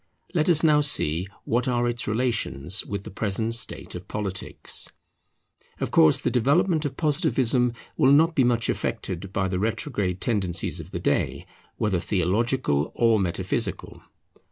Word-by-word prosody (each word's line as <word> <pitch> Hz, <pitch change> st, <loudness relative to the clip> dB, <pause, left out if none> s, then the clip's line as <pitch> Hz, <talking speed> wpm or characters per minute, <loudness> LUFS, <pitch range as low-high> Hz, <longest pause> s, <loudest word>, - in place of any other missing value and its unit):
Let 165 Hz, -1 st, +1 dB
us 165 Hz, -2 st, +5 dB
now 150 Hz, -2 st, +5 dB
see 90 Hz, -, +3 dB, 0.2 s
what 120 Hz, +2 st, 0 dB
are 120 Hz, -1 st, +1 dB
its 120 Hz, 0 st, -1 dB
relations 110 Hz, -, -1 dB
with 100 Hz, -1 st, -5 dB
the -, -, -9 dB
present 110 Hz, +2 st, -1 dB
state 115 Hz, -1 st, -1 dB
of -, -, -8 dB
politics. 95 Hz, -3 st, -4 dB, 0.9 s
Of -, -, -3 dB
course 80 Hz, -, +5 dB
the -, -, -1 dB
development 150 Hz, +6 st, +2 dB
of 135 Hz, -2 st, -4 dB
Positivism 135 Hz, -, +2 dB, 0.2 s
will 130 Hz, -, +4 dB
not 160 Hz, +4 st, +5 dB
be 135 Hz, -, +3 dB
much 120 Hz, -1 st, +1 dB
affected 95 Hz, 0 st, -3 dB
by 95 Hz, -1 st, 0 dB
the 90 Hz, -1 st, -2 dB
retrograde 105 Hz, -4 st, -2 dB
tendencies 95 Hz, -7 st, -1 dB
of -, -, -9 dB
the -, -, -5 dB
day, -, -, -1 dB, 0.3 s
whether 100 Hz, -4 st, 0 dB
theological 95 Hz, -, 0 dB
or 115 Hz, -2 st, +3 dB
metaphysical. 90 Hz, -3 st, -3 dB
115 Hz, 150 wpm, -25 LUFS, 95-130 Hz, 0.9 s, us